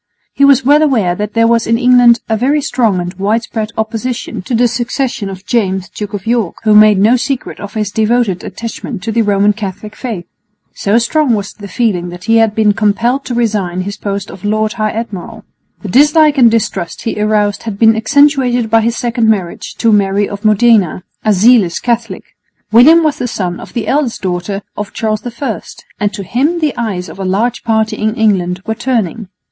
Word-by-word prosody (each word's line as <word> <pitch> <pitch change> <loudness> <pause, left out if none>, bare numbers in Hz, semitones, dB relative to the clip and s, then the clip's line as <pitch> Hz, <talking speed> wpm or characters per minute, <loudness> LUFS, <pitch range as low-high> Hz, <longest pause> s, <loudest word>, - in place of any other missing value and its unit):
He 280 - +1
was 275 -2 +5
well 295 +3 +5
aware 230 - +2
that 210 +3 -5
there 230 0 +3
was 230 0 +1
in 230 0 +2
England 245 -2 +5
a 220 - 0
very 270 +7 +1
strong 235 -8 0
and 175 +1 -4
widespread 220 +1 -1
opposition 225 +2 -3
to 235 +6 -3
the 240 +2 +3
succession 235 -2 -3
of 190 0 -9
James 190 -6 -1
Duke 205 -1 -6
of 195 - -7
York, 230 -5 0
who 215 -1 +3
made 210 -1 +6
no 215 +6 +4
secret 265 +1 -4
of 205 +1 -8
his 210 -2 -2
devoted 220 -3 0
attachment 230 -3 -7
to 225 - -2
the 230 +1 +1
Roman 205 -1 +2
Catholic 210 0 -7
faith. 220 -9 -5 0.5
So 205 +3 0
strong 245 +2 +1
was 200 -1 -5
the 205 - -10
feeling 190 -6 -1
that 175 +1 -10
he 225 +3 +2
had 225 -2 +2
been 215 -2 +3
compelled 230 +6 0
to 245 - -4
resign 205 -6 -1
his 200 +2 -5
post 200 -1 -5
of 190 - -12
Lord 215 +1 0
High 215 -1 -1
Admiral. 215 -5 -6 0.4
The 205 - -5
dislike 295 - +4
and 240 -2 +7
distrust 210 -6 -2
he 220 -2 -3
aroused 210 -1 +1
had 200 - -6
been 225 +1 +4
accentuated 250 -1 +2
by 225 0 +4
his 230 +1 0
second 235 -2 0
marriage 190 -6 -2
to 230 - +1
Mary 200 -1 +2
of 200 +1 -8
Modena, 215 -4 +3 0.2
a 215 - +2
zealous 205 -3 +3
Catholic. 235 -1 -2 0.5
William 305 +9 +6
was 305 -2 0
the 245 - -2
son 180 -6 -4
of - - -11
the 235 - -3
eldest 275 -7 -1
daughter 185 +2 -3
of 210 -1 -6
Charles 215 -1 -2 0.2
I, 255 -7 -3 0.4
and 205 -1 0
to 200 - -6
him 285 - 0
the 305 -5 -1
eyes 195 -6 -3
of - - -11
a - - -3
large 215 +6 -1
party 220 -1 0
in 215 +1 -1
England 190 -5 0
were 220 - -1
turning. 225 -4 -2
220 Hz, 200 wpm, -13 LUFS, 200-240 Hz, 0.5 s, and